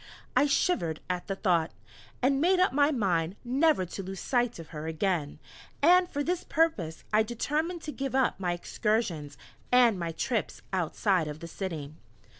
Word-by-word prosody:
I 290 - +5
shivered 170 - +1
at 180 -1 -4
the 195 - -2
thought! 175 -5 +1 0.5
and 270 +2 +3
made 365 +3 +4
up 370 - +3
my 285 +1 +4
mind 185 - 0
never 270 - +3
to 180 - -6
lose 190 0 -6
sight 245 -2 0
of 165 -2 -10
her 155 -1 -6
again, 160 -2 -1 0.4
and 355 +4 +5
for 290 0 -2
this 355 +3 -1
purpose 280 - 0
I 215 - +6
determined 300 +10 -2
to 300 - -4
give 270 -2 -4
up 265 -6 +2
my 180 -2 0
excursions, 175 -6 -2 0.3
and 240 -6 +5
my 170 -1 -2
trips 225 +7 -2
outside 185 0 +1
of 150 0 -6
the 170 - -7
city. 160 -5 -5
205 Hz, 170 wpm, -29 LUFS, 170-280 Hz, 0.5 s, I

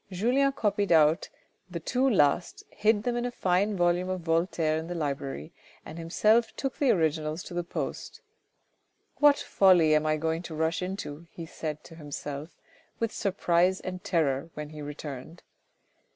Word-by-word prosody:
Julien 250 +9 +2
copied 205 -6 0
out 160 +1 +4 0.4
the 175 -2 -5
two 255 +10 +1
last, 175 - +2
hid 210 -1 +2
them 245 0 -1
in 240 - -1
a 245 - -1
fine 195 -2 0
volume 175 +1 +2
of 185 -1 -2
Voltaire 165 -1 +1
in 160 +1 -4
the 175 - -4
library 140 - -4 0.3
and 160 +2 -8
himself 215 +8 +2
took 270 -1 -4
the 280 - +3
originals 160 -3 +1
to - - -9
the 175 0 -1
post. 170 - -5 0.5
" - - -46
What 290 -1 +6
folly 180 -5 +4
am 155 0 +2
I 155 0 +2
going 160 +1 -1
to 170 -3 -7
rush 160 +2 0
into," 175 -4 -5
he 165 - -8
said 155 -1 -6
to - - -13
himself 145 -1 -6 0.5
with 230 -1 -1
surprise 185 -2 +1
and 185 0 -6
terror 155 -3 0
when 150 0 -6
he 155 -1 -9
returned. 145 +1 -8
170 Hz, 165 wpm, -28 LUFS, 155-195 Hz, 0.5 s, What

